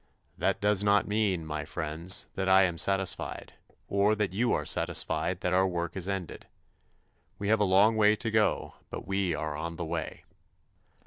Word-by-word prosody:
That -, -, 0 dB
does 105 Hz, -1 st, +2 dB
not 105 Hz, 0 st, +3 dB
mean, 105 Hz, -6 st, 0 dB
my 75 Hz, -1 st, -4 dB
friends, 80 Hz, +6 st, -1 dB
that 95 Hz, -1 st, -2 dB
I 95 Hz, +1 st, +6 dB
am 85 Hz, -3 st, -1 dB
satisfied, 95 Hz, -1 st, -2 dB, 0.3 s
or 100 Hz, +2 st, +2 dB
that 105 Hz, -3 st, -1 dB
you 120 Hz, +4 st, +1 dB
are -, -, 0 dB
satisfied -, -, 0 dB
that 90 Hz, -, 0 dB
our 95 Hz, +1 st, +3 dB
work 85 Hz, -2 st, -3 dB
is 95 Hz, 0 st, -3 dB
ended. 95 Hz, -4 st, -5 dB, 0.9 s
We 100 Hz, -, -3 dB
have 110 Hz, 0 st, +3 dB
a 105 Hz, -, +3 dB
long 100 Hz, +4 st, +4 dB
way 105 Hz, -1 st, +4 dB
to 115 Hz, -1 st, -3 dB
go 110 Hz, -1 st, +1 dB, 0.2 s
but -, -, -7 dB
we 95 Hz, -3 st, 0 dB
are 75 Hz, -1 st, -4 dB
on 85 Hz, +2 st, -5 dB
the 85 Hz, -, -4 dB
way. 80 Hz, 0 st, -5 dB
95 Hz, 180 wpm, -29 LUFS, 85-105 Hz, 0.9 s, I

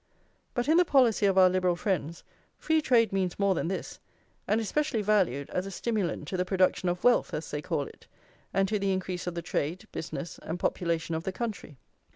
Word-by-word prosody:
But 245 Hz, +1 st, 0 dB
in 315 Hz, +2 st, +5 dB
the 355 Hz, -, +7 dB
policy 250 Hz, -, +4 dB
of 190 Hz, -1 st, +1 dB
our 185 Hz, -1 st, +8 dB
Liberal 185 Hz, -1 st, +2 dB
friends 170 Hz, -3 st, -2 dB, 0.3 s
free 315 Hz, 0 st, +1 dB
trade 230 Hz, -7 st, +3 dB
means 185 Hz, -2 st, 0 dB
more 200 Hz, -1 st, +3 dB
than 170 Hz, -, -2 dB
this, 190 Hz, -, -4 dB, 0.5 s
and 215 Hz, -, +2 dB
is 220 Hz, -, -3 dB
specially 290 Hz, -6 st, 0 dB
valued 185 Hz, -10 st, +2 dB
as 180 Hz, +2 st, -2 dB
a -, -, -4 dB
stimulant 195 Hz, -6 st, -2 dB
to 185 Hz, -, -2 dB
the 180 Hz, -, +1 dB
production 185 Hz, -1 st, +1 dB
of 175 Hz, 0 st, -3 dB
wealth, 245 Hz, 0 st, +3 dB
as 155 Hz, -, -5 dB
they 145 Hz, -, -3 dB
call 155 Hz, -2 st, -1 dB
it, -, -, -13 dB, 0.4 s
and 195 Hz, 0 st, +2 dB
to 210 Hz, +1 st, 0 dB
the 195 Hz, -1 st, +1 dB
increase 185 Hz, -1 st, -3 dB
of 175 Hz, -, -3 dB
the 170 Hz, -, -4 dB
trade, 165 Hz, +1 st, -2 dB
business, 165 Hz, +1 st, -6 dB
and 165 Hz, +2 st, -5 dB
population 165 Hz, -2 st, -1 dB
of 160 Hz, 0 st, -2 dB
the 190 Hz, -, -2 dB
country. 205 Hz, -, -5 dB
185 Hz, 210 wpm, -28 LUFS, 170-215 Hz, 0.5 s, our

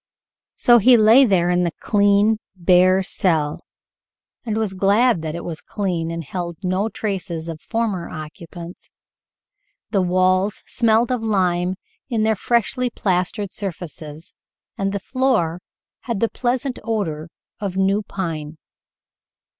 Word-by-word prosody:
So 240 Hz, -1 st, +5 dB
he 245 Hz, +3 st, +6 dB
lay 225 Hz, +5 st, +7 dB
there 180 Hz, -5 st, +2 dB
in 180 Hz, 0 st, +2 dB
the 170 Hz, -2 st, -1 dB
clean, 205 Hz, +1 st, +3 dB, 0.2 s
bare 185 Hz, +1 st, +4 dB
cell, 160 Hz, -5 st, 0 dB, 0.8 s
and 220 Hz, -3 st, -2 dB
was 220 Hz, -3 st, -1 dB
glad 200 Hz, +2 st, +3 dB
that 160 Hz, 0 st, -4 dB
it 170 Hz, -, -6 dB
was 165 Hz, -2 st, -5 dB
clean 180 Hz, -5 st, -2 dB
and 165 Hz, 0 st, -4 dB
held 170 Hz, +2 st, -5 dB
no 185 Hz, +4 st, 0 dB
traces 185 Hz, -6 st, -4 dB
of 160 Hz, -2 st, -6 dB
former 220 Hz, -6 st, -2 dB
occupants. 170 Hz, +3 st, -9 dB, 1.0 s
The 200 Hz, -3 st, +2 dB
walls 185 Hz, +2 st, +1 dB
smelled 230 Hz, +1 st, +2 dB
of 250 Hz, -2 st, 0 dB
lime 185 Hz, -4 st, +1 dB, 0.3 s
in 225 Hz, -4 st, 0 dB
their 220 Hz, 0 st, +3 dB
freshly 240 Hz, +4 st, 0 dB
plastered 190 Hz, -1 st, -1 dB
surfaces, 160 Hz, -5 st, -7 dB, 0.4 s
and 195 Hz, 0 st, -1 dB
the 200 Hz, -, -2 dB
floor 215 Hz, -9 st, 0 dB, 0.5 s
had 235 Hz, -5 st, -2 dB
the 230 Hz, -, +1 dB
pleasant 250 Hz, +1 st, -2 dB
odor 175 Hz, -9 st, -2 dB, 0.3 s
of 195 Hz, -3 st, -4 dB
new 195 Hz, +2 st, +2 dB
pine. 160 Hz, -6 st, -5 dB
190 Hz, 130 wpm, -21 LUFS, 170-220 Hz, 1.0 s, lay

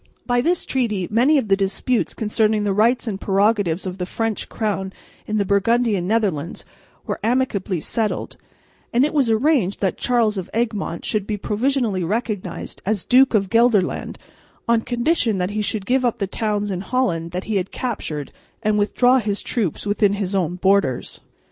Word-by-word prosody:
By 245 Hz, -1 st, +2 dB
this 345 Hz, +5 st, +1 dB
treaty 215 Hz, -9 st, -1 dB
many 255 Hz, +8 st, +4 dB
of 260 Hz, -, 0 dB
the 195 Hz, -, +4 dB
disputes 200 Hz, +5 st, -1 dB
concerning 215 Hz, -1 st, +1 dB
the 200 Hz, -1 st, +1 dB
rights 230 Hz, +6 st, +2 dB
and 200 Hz, -3 st, -3 dB
prerogatives 200 Hz, -3 st, +1 dB
of 185 Hz, 0 st, -5 dB
the 180 Hz, -, -3 dB
French 225 Hz, +1 st, -3 dB
crown 195 Hz, -3 st, -2 dB, 0.3 s
in 215 Hz, -, -1 dB
the 200 Hz, -, +1 dB
Burgundian 200 Hz, -1 st, +2 dB
Netherlands 195 Hz, -7 st, -1 dB, 0.4 s
were -, -, -3 dB
amicably 215 Hz, -6 st, 0 dB
settled; 215 Hz, +6 st, -2 dB, 0.6 s
and 250 Hz, +3 st, +3 dB
it 300 Hz, -, -2 dB
was 275 Hz, -6 st, +2 dB
arranged 225 Hz, -, +2 dB
that 190 Hz, -3 st, 0 dB
Charles 225 Hz, -5 st, +1 dB
of 180 Hz, -, -7 dB
Egmont 220 Hz, -7 st, -2 dB
should 210 Hz, -2 st, -1 dB
be 210 Hz, -, -2 dB
provisionally 220 Hz, -2 st, 0 dB
recognised 205 Hz, -2 st, -3 dB
as 205 Hz, -1 st, -1 dB
Duke 255 Hz, -1 st, +5 dB
of 195 Hz, -3 st, +1 dB
Gelderland 230 Hz, -5 st, +2 dB, 0.5 s
on 235 Hz, -1 st, +3 dB
condition 240 Hz, -, 0 dB
that 180 Hz, +1 st, -1 dB
he 210 Hz, +1 st, -1 dB
should 205 Hz, -1 st, -2 dB
give 255 Hz, +3 st, +2 dB
up 240 Hz, -2 st, +1 dB
the 200 Hz, -, -1 dB
towns 205 Hz, 0 st, -2 dB
in 185 Hz, -1 st, -3 dB
Holland 190 Hz, -8 st, -1 dB
that 180 Hz, +2 st, -4 dB
he 215 Hz, -2 st, -1 dB
had 190 Hz, 0 st, -2 dB
captured 150 Hz, -, -4 dB, 0.3 s
and 210 Hz, 0 st, +2 dB
withdraw 245 Hz, +5 st, +3 dB
his 205 Hz, -3 st, -2 dB
troops 205 Hz, -, -1 dB
within 205 Hz, 0 st, +2 dB
his 200 Hz, -1 st, -2 dB
own 180 Hz, -3 st, 0 dB
borders. 190 Hz, -8 st, +1 dB
210 Hz, 175 wpm, -21 LUFS, 195-235 Hz, 0.6 s, Duke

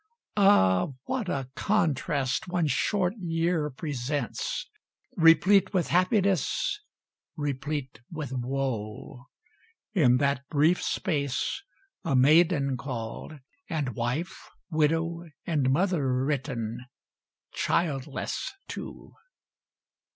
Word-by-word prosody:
Ah, 95 Hz, -, +5 dB, 0.2 s
what 250 Hz, -8 st, -2 dB
a 135 Hz, -5 st, -2 dB
contrast 145 Hz, -9 st, 0 dB
one 175 Hz, -2 st, 0 dB
short 180 Hz, +4 st, +1 dB
year 165 Hz, -3 st, 0 dB
presents! 140 Hz, -2 st, -3 dB, 0.5 s
Replete 185 Hz, +5 st, +5 dB
with 180 Hz, -, +1 dB
happiness 200 Hz, -, +2 dB, 0.6 s
replete 145 Hz, -2 st, -3 dB
with 155 Hz, -5 st, -5 dB
woe; 125 Hz, -1 st, -4 dB, 0.7 s
In 130 Hz, -, +5 dB
that 140 Hz, 0 st, +1 dB
brief 155 Hz, +4 st, +3 dB
space, 145 Hz, -, -1 dB, 0.4 s
a 135 Hz, -, 0 dB
maiden 140 Hz, 0 st, +4 dB
called, 130 Hz, +3 st, -6 dB, 0.3 s
and 155 Hz, -6 st, -1 dB
wife, 125 Hz, -, -3 dB, 0.2 s
Widow 165 Hz, +2 st, +1 dB, 0.2 s
and 145 Hz, -6 st, +1 dB
mother 140 Hz, -5 st, +1 dB
written 125 Hz, -4 st, -3 dB, 0.7 s
childless 145 Hz, -4 st, -1 dB, 0.2 s
too. -, -, -8 dB
150 Hz, 85 wpm, -28 LUFS, 130-175 Hz, 0.7 s, Ah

